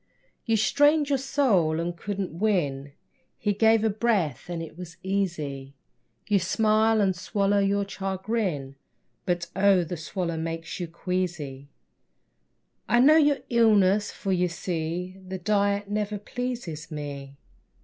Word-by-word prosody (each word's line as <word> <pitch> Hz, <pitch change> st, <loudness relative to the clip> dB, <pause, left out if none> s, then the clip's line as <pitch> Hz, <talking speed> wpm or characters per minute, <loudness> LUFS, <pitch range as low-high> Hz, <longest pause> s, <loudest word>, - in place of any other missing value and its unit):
You 225 Hz, -1 st, +3 dB
strained 290 Hz, +6 st, +3 dB
your 275 Hz, -2 st, +2 dB
soul 215 Hz, -, +2 dB
and 170 Hz, +1 st, -2 dB
couldn't 195 Hz, 0 st, -4 dB
win; 145 Hz, -10 st, 0 dB, 0.4 s
He 205 Hz, -1 st, 0 dB
gave 220 Hz, +1 st, +4 dB
a 220 Hz, -, +3 dB
breath 200 Hz, -8 st, 0 dB
and 175 Hz, -1 st, -3 dB
it 160 Hz, -, -10 dB
was 175 Hz, -1 st, -9 dB
easy. 155 Hz, -8 st, -3 dB, 0.5 s
You 205 Hz, -2 st, +3 dB
smile 215 Hz, +3 st, +2 dB
and 190 Hz, -2 st, +2 dB
swallow 200 Hz, +2 st, +1 dB
your 200 Hz, 0 st, +1 dB
chagrin, 190 Hz, -8 st, -3 dB, 0.5 s
But, 175 Hz, -1 st, -1 dB
oh, 195 Hz, -2 st, +4 dB
the 170 Hz, +1 st, -5 dB
swallow 170 Hz, +1 st, -3 dB
makes 165 Hz, +2 st, -4 dB
you 175 Hz, -, -3 dB
queasy. 165 Hz, -6 st, -4 dB, 1.2 s
I 240 Hz, -, +4 dB
know 300 Hz, +5 st, +7 dB
your 290 Hz, -3 st, +3 dB
illness, 210 Hz, -3 st, +4 dB
for, 195 Hz, -, -4 dB
you 180 Hz, -1 st, +2 dB
see, 175 Hz, +2 st, -4 dB
The 190 Hz, 0 st, -4 dB
diet 200 Hz, +1 st, +1 dB
never 210 Hz, 0 st, -2 dB
pleases 220 Hz, -8 st, -5 dB
me. 140 Hz, -3 st, -7 dB
190 Hz, 135 wpm, -26 LUFS, 165-215 Hz, 1.2 s, know